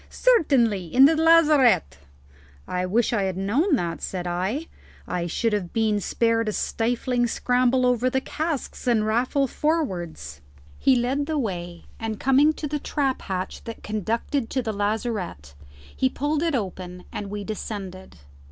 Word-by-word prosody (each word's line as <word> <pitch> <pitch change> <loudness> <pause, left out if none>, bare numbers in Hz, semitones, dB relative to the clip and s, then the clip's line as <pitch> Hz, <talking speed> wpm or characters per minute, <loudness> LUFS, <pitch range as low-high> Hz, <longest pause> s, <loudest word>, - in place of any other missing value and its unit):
"Certainly; 255 - +2
in 260 +11 +6
the 320 +3 +5
lazarette." 300 - +4 0.7
"I 180 0 -2
wish 230 +5 +1
I 215 - +1
had 190 -1 -2
known 265 - +2
that," 170 -8 -3
said 180 -2 -4
I; 190 - -2 0.4
"I 175 -1 -2
should 225 +6 0
have 185 -4 -2
been 220 -2 +1
spared 230 +2 +1
a - - -3
stifling 240 +3 0
scramble 250 +1 +2
over 250 0 +2
the 265 - +1
casks 305 -1 -4
and 225 -3 +3
raffle 250 +6 +1
forwards." 180 - -2 0.4
He 265 - +4
led 260 +4 0
the 315 -1 -1
way, 175 - -4 0.2
and 220 -2 -4
coming 270 +3 +4
to 305 - -5
the 295 +1 -2
trap 275 -2 -1
hatch 185 -1 -4
that 230 - -8
conducted 225 +5 -2
to 260 - -1
the 220 -1 -2
lazarette, 205 - -3 0.4
he 130 - +2
pulled 290 - -1
it 330 -3 +1
open 180 -4 -5
and 200 - -5
we 205 0 -5
descended. 195 - -6
230 Hz, 155 wpm, -24 LUFS, 190-270 Hz, 0.7 s, in